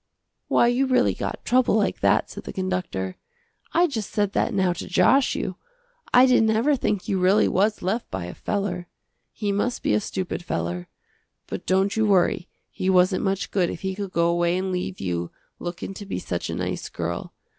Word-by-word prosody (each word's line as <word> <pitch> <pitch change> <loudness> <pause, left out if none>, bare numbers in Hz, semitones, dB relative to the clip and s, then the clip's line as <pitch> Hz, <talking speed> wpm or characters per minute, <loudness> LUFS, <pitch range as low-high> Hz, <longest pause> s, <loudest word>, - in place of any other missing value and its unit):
"Why - - +4
you 245 +3 +2
really 255 -1 +3
got - - -5
trouble 250 -3 +3
like 210 -2 +1
that," - - +3
said - - -9
the - - -5
conductor, 180 - -3 0.5
"I 345 +2 +4
just 225 - -3
said 205 -2 0
that - - +1
now 190 -4 +2
to 175 - -7
josh 265 +8 +4
you. 185 -1 -3 0.5
I 250 +1 +7
didn't 250 -4 +4
ever 235 +7 +3
think 210 -6 -1
you 195 - 0
really 190 +3 +4
was 210 +3 +1
left 215 +6 -1
by 95 -2 -4
a 90 - -7
feller. 185 -3 -3 0.4
He 205 -2 -2
must 205 +5 -1
be - - +2
a - - +4
stupid 185 -3 -4
feller. 85 - -3 0.6
But - - -6
don't 190 +2 +2
you 220 -1 +2
worry, 185 -3 +2 0.2
he 185 - -2
wasn't 185 0 +4
much 195 -1 -1
good 185 -3 +2
if - - -6
he 190 0 -2
could 200 0 -5
go 170 -1 +2
away 175 +1 +1
and 190 0 -2
leave 185 +1 -3
you, 85 -2 -2 0.3
lookin' 175 +2 -5
to 205 - -8
be - - -3
such 85 -1 -3
a - - -3
nice - - -3
girl. - - -4
190 Hz, 200 wpm, -24 LUFS, 180-215 Hz, 0.6 s, I